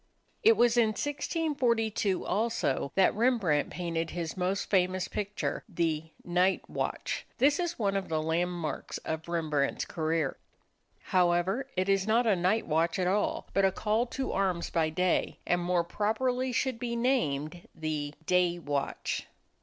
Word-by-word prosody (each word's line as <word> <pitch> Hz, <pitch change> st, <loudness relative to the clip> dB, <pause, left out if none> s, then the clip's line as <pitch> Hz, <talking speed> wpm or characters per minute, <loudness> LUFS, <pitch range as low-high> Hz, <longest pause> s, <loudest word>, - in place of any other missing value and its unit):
It 450 Hz, 0 st, +6 dB
was 240 Hz, 0 st, +4 dB
in 235 Hz, -2 st, +5 dB
1642 240 Hz, -, 0 dB
also 210 Hz, -, 0 dB
that 190 Hz, -, +4 dB
Rembrandt 215 Hz, -, +2 dB
painted 165 Hz, -2 st, -3 dB
his 170 Hz, -2 st, -4 dB
most 185 Hz, +2 st, -1 dB
famous 185 Hz, -1 st, +1 dB
picture 205 Hz, 0 st, -3 dB
the 160 Hz, -3 st, -1 dB
"Night 180 Hz, +2 st, +1 dB
Watch." -, -, -3 dB
This 285 Hz, +4 st, +4 dB
is 345 Hz, -1 st, -1 dB
one 200 Hz, -3 st, 0 dB
of 195 Hz, -1 st, -2 dB
the 160 Hz, -1 st, 0 dB
landmarks 165 Hz, +1 st, -2 dB
of 160 Hz, +1 st, -4 dB
Rembrandt's 155 Hz, -5 st, 0 dB
career. 160 Hz, -3 st, -1 dB, 0.8 s
However, 180 Hz, +7 st, +2 dB
it 185 Hz, +1 st, +1 dB
is 195 Hz, 0 st, +2 dB
not 230 Hz, +3 st, +3 dB
a 215 Hz, -3 st, +4 dB
night 185 Hz, +5 st, +1 dB
watch 165 Hz, +3 st, +1 dB
at 185 Hz, -, 0 dB
all, 200 Hz, +3 st, 0 dB
but 195 Hz, -, +3 dB
a 190 Hz, -, +4 dB
call 220 Hz, +5 st, 0 dB
to 265 Hz, +2 st, -3 dB
arms 185 Hz, -3 st, 0 dB
by 160 Hz, -2 st, +2 dB
day, 180 Hz, +3 st, 0 dB
and 175 Hz, 0 st, +1 dB
more 175 Hz, 0 st, +1 dB
properly 245 Hz, +8 st, 0 dB
should 250 Hz, 0 st, -1 dB
be 235 Hz, -1 st, -2 dB
named 175 Hz, -, 0 dB
the 155 Hz, -2 st, -3 dB
"Day 180 Hz, 0 st, +2 dB
Watch." 145 Hz, -4 st, -3 dB
185 Hz, 150 wpm, -29 LUFS, 165-225 Hz, 0.8 s, It